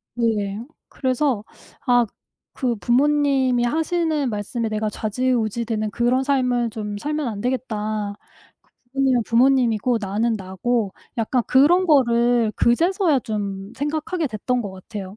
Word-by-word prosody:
네. 220 -2 -1 0.2
그래서 255 -4 0 0.4
아 245 -2 +4 0.5
그 245 -3 +1
'부모님이 265 +1 +2
하시는 315 +1 0
말씀에 220 +2 -3
내가 215 0 -2
좌지우지되는 220 -1 -1
그런 250 +2 +1
삶을 250 -4 +1
좀 210 -1 -5
살면 300 +1 -2
안 210 -3 -5
되겠다.' 215 -4 -2 0.5
그 - - -35 0.3
'부모님은 265 -3 +2
부모님이고 245 -1 +3
나는 215 +4 0
나고.' 200 +2 -2 0.3
약간 235 +2 +1
그런 340 +8 +4
것을 240 -5 +3
그제서야 330 - +2
좀 200 -2 -4
생각하게 310 +4 -2
됐던 245 +1 -1
것 200 -4 -5
같아요. 190 +1 -8
240 Hz, 275 characters per minute, -22 LUFS, 215-265 Hz, 0.5 s, 아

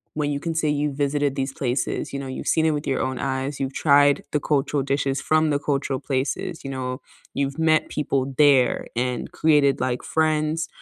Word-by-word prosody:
when 150 -1 -1
you 140 - -2
can 165 +2 -3
say 160 -1 +1
you 150 0 0
visited 145 0 0
these 135 0 -2
places, 125 -2 -2
you 140 - -4
know, 135 - -6
you've 130 - -6
seen 160 - +2
it 160 - +3
with 150 -1 -3
your 135 - 0
own 130 -1 -2
eyes, 135 +1 -2
you've 135 0 -2
tried 145 -1 +4
the 150 - +1
cultural 140 -1 0
dishes 140 0 -1
from 155 0 +2
the 145 -1 +1
cultural 140 -2 -1
places, 145 +6 -3
you 135 - -5
know. 130 -1 -4 0.4
You've 140 0 -1
met 160 -1 +2
people 135 -2 -1
there 140 -5 +4
and 125 0 -2
created, 145 -4 +3
like, 125 -1 -1
friends 155 0 0
140 Hz, 200 wpm, -23 LUFS, 135-150 Hz, 0.4 s, tried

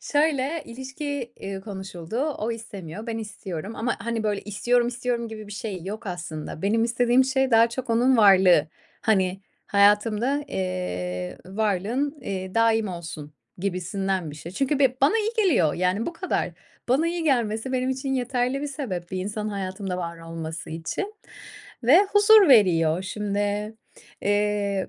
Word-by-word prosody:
Şöyle: 295 +1 +1
İlişki, 265 +1 -5
eee, 195 0 -5
konuşuldu. 190 -2 -7 0.2
O 220 +2 -2
istemiyor, 210 -3 -8
ben 225 -1 -3
istiyorum 205 -2 -6
ama, 240 +2 -1
hani, 230 -1 -2
böyle 210 -2 0
"İstiyorum, 240 +4 +1
istiyorum!" 240 -1 -2
gibi 215 -1 -8
bir 205 - -9
şey 200 -3 -5
yok 215 +3 -6
aslında. 170 -3 -6
Benim 225 +3 +2
istediğim 245 +2 +3
şey 265 0 +1
daha 230 0 +6
çok 240 0 -5
onun 250 +3 +4
varlığı. 190 -7 +6 0.3
Hani, 190 -3 +1 0.3
hayatımda, 210 +7 +3
eee, 90 - -3
varlığın, 220 - -1
eee, 190 -5 -5
daim 225 -1 +3
olsun 160 -4 -7 0.3
gibisinden 190 -1 -2
bir 145 - -10
şey. 165 +3 -9
Çünkü 275 +6 0
be 260 -2 +3
bana 280 +10 +4
iyi 435 +1 0
geliyor, 180 - +3
yani, 185 +5 0
bu 340 - -3
kadar. 370 +3 -2 0.4
Bana 280 +7 +3
iyi 340 -1 -2
gelmesi 240 -3 0
benim 255 0 0
için 265 +1 -2
yeterli 250 +1 0
bir - - -1
sebep 225 - -5
bir 185 - -3
insanın 210 +3 -3
hayatımda 190 -1 -4
var 170 -1 -5
olması 165 -1 -6
için 165 - -4 0.7
ve 270 +10 +7
huzur 410 -2 +7
veriyor. 180 - +5
Şimdi, 205 +2 -2 0.5
eee, 205 -1 0
210 Hz, 150 wpm, -25 LUFS, 185-250 Hz, 0.7 s, ve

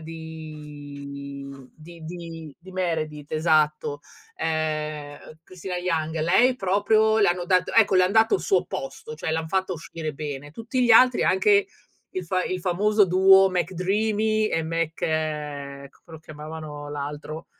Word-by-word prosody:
di 145 -3 -9 0.3
di 165 +1 -13
di 165 -3 -8
di 190 +2 -14
Meredith, 155 -5 -3
esatto, 155 -2 +1 0.4
ehm, 155 -2 -2
uhm, 155 - -14
Cristina 185 +1 -7
Yang. 165 -3 -1
Lei 230 +11 +4
proprio 215 +3 +2
le 205 - +4
hanno 175 0 0
dato 185 0 +2
ecco 220 -3 +4
le 185 - +6
han 185 - 0
dato 225 - +4
il - - +1
suo 400 - +2
posto, 460 -2 -6
cioè 160 - -4
l'han 160 0 -2
fatta 190 0 0
uscire 160 -1 -6
bene. 145 0 -6
Tutti 230 - -2
gli 240 - +2
altri, 250 +2 +6
anche 200 +1 +4 0.4
il 185 -1 -4
fa 185 +2 0
il 185 -1 -3
famoso 205 +3 +2
duo 190 +1 +6
McDreamy 205 +5 0
e 165 - 0
Mc 165 0 -1
c 150 -3 -3
come 165 - -20
lo - - -13
chiamavano 150 -1 -8
l'altro? 150 +2 -6
165 Hz, 150 wpm, -24 LUFS, 155-190 Hz, 0.4 s, le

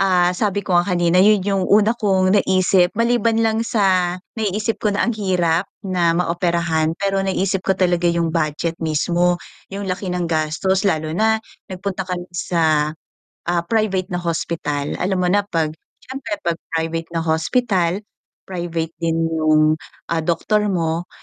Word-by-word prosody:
ah, 180 -2 +3
sabi 200 +1 -1
ko 180 -2 +2
nga 175 - +1
kanina 175 0 +2
yun 205 0 +5
yung 195 -1 0
una 210 +2 +4
kong 190 -3 +2
naisip, 185 -1 +3
maliban 230 0 +2
lang 220 0 +1
sa 185 -5 +2 0.2
naiisip 215 +1 -1
ko 210 -2 0
na - - +1
ang 240 - +1
hirap 180 -3 +1 0.2
na 180 -4 +1
maoperahan 170 -2 0
pero 195 +2 -1
naisip 190 0 0
ko 190 - +3
talaga 175 -2 +1
yung 170 -1 +1
budget 155 +2 -1
mismo 170 +3 +1 0.4
yung 200 0 -4
laki 185 0 -3
ng 175 -2 -2
gastos 165 +5 0
lalo 155 -4 0
na 220 +6 +1 0.2
nagpunta 190 -1 -4
kan 180 -1 -3
sa, 160 -3 +1 0.5
ah 175 -1 +1
private 210 -4 0
na 175 - -1
hospital, 160 -4 -2
alam 190 +1 0
mo 180 - +1
na 205 - +4
pag 160 -4 0 0.3
syempre 260 -2 -7
pag 170 -1 +1 0.2
private 165 0 -2
na 165 - +1
hospital, 170 +2 +1 0.5
private 170 -3 -3
din 165 -1 +1
yung 155 -1 +3 0.4
ah 165 - +1
doktor 210 +6 +1
mo, 165 -1 -1
180 Hz, 155 wpm, -20 LUFS, 165-195 Hz, 0.5 s, yun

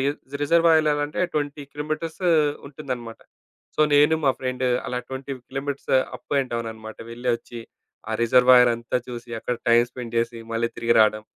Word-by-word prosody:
రి 135 - +1 0.4
రిజర్వాయర్ 165 +1 +4
ఎలా 150 -1 +3
అంటే 150 - -5
20 145 -1 -2
కిలోమీటర్స్ 155 +3 -4 0.5
ఉంటుందన్నమాట. 125 -5 -7 0.6
సో, - - 0
నేను 150 +2 +5
మా 135 - +5
ఫ్రెండు 130 0 -1 0.2
అలా 125 0 -2
20 135 +1 -5
కిలోమీటర్స్ 140 +1 -4 0.2
అప్ - - -6
అండ్ 130 -3 -5
డౌననమాట. 110 -1 -6
వెళ్లి 120 +2 -5
వచ్చి, 120 0 -10 0.5
ఆ - - -2
రిజర్వాయరంతా 125 0 +5
చూసి 120 -1 -8
అక్కడ 125 - -2
టైమ్ 120 +1 +5
స్పెండ్ 120 -2 -6
చేసి, 115 0 -1
మళ్ళీ 115 +1 0
తిరిగి 115 0 +2
రాడం. 110 0 +3
125 Hz, 155 wpm, -24 LUFS, 115-145 Hz, 0.6 s, నేను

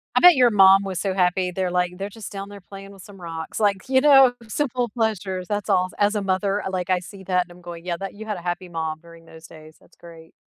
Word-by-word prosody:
I - - +5
bet 355 0 +8
your 250 -2 +5
mom 195 -2 +6
was 190 -3 -4
so 195 +1 -1
happy 180 0 +1
there 185 0 -2
like, 180 0 -1
"They're 195 +2 -5
just 215 0 -10
down 200 -1 -7
there 200 -1 -11
playing 195 +1 -12
with 195 -2 -14
some 195 -2 -14
rocks, 165 +1 -6
like, 200 -3 0
you 260 0 +3
know, 270 -3 +6
simple 250 0 -2
pleasures, 200 -5 -2
that's 205 -2 -3
all." 185 0 +2
As 205 +1 +2
a 210 - 0
mother, 195 +1 -1
like, 185 -1 -3
I 185 -1 +2
see 190 +2 -12
that 180 -1 +1
and 175 - -19
I'm 175 +1 -15
going, 170 -1 -10
"Yeah, 175 -1 -2
that" 195 +2 -6
you 220 +2 -9
had 210 -2 -4
a - - -9
happy 175 +1 -4
mom 160 -2 -4
during 170 0 -16
those 160 0 -14
days, 155 0 -15
that's - - -25
great. 165 -1 -15
190 Hz, 265 wpm, -23 LUFS, 175-205 Hz, -, bet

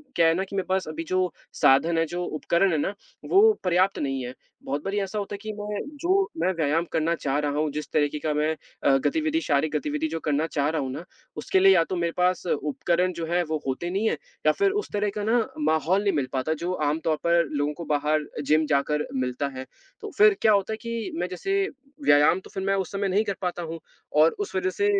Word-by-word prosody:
क्या 165 - +5
है 165 - +4
ना 185 +3 -1
कि 195 +1 -8
मेरे 190 - -1
पास 190 -2 0
अभी 155 +1 -4
जो 185 0 +1 0.2
साधन 160 +5 +4
हैं, 165 - +3
जो 175 +2 -4
उपकरण 170 +4 +1
हैं 160 - +1
ना, 170 +7 -1 0.3
वो 430 +3 +6
पर्याप्त 185 +2 +2
नहीं 135 -2 -2
हैं, 125 - -6 0.3
बहुत 145 +2 -3
बारी 200 +1 -1
ऐसा 195 +2 -3
होता 200 0 -5
है - - -3
कि 215 0 -5
मैं 205 0 -3 0.2
जो 375 +3 +3 0.2
मैं 175 +3 +1
व्यायाम 165 0 +1
करना 165 +1 +1
चाह 140 -3 -1
रहा 145 -1 -1
हूँ, 155 -1 0
जिस 150 +1 -5
तरीके 150 0 +1
का 155 0 -1
मैं 150 +1 +1 0.3
अ, 135 - +5
गतिविधि 320 0 +1
शारीरिक 150 - 0
गतिविधि 300 - -2
जो - - -2
करना 150 +2 +1
चाह 145 -2 0
रहा 160 -1 -1
हूँ 130 -1 -3
ना, 150 - -6 0.3
उसके 155 +5 +1
लिए 195 +1 +7
या 170 - +5
तो 185 - -1
मेरे 170 -1 0
पास 180 0 +1
उपकरण 170 +4 0
जो 170 -1 -4
हैं, 175 0 +2
वो 155 -2 -3
होते 135 +6 -2
नहीं 200 +5 0
हैं - - -1 0.3
या - - +6
फिर 395 0 +2
उस - - -6
तरह 205 0 +1
का 210 - -2
ना 225 +3 +3 0.2
माहौल 160 +5 +2
नहीं 200 - +2
मिल 140 -3 0
पाता, 135 +4 0
जो 170 +3 -3 0.2
आमतौर 155 +1 0
पर 170 0 +4
लोगों 145 +1 0
को 170 +2 -8
बाहर 150 +1 +1
अ, 150 - -8
जिम 155 +2 +3
जाकर 150 +1 +1
मिलता 130 +1 -1
है। 130 - -5 0.4
तो - - -6
फिर 420 0 +6
क्या 220 - +5
होता 200 +2 +1
है - - -4
कि 230 -2 -4
मैं 175 +1 -1
जैसे, 390 - -1 0.4
व्यायाम 145 +5 +5
तो - - -15
फिर 190 - -3
मैं 195 0 +1
उस 190 - -3
समय 200 0 -1
नहीं 200 +3 +2
कर 200 - -1
पाता 180 -1 -2
हूँ 165 0 -6 0.4
और 160 - +6
उस 410 -1 -4
वज़ह 385 0 +1
से 405 - -1
170 Hz, 245 wpm, -25 LUFS, 150-195 Hz, 0.4 s, लिए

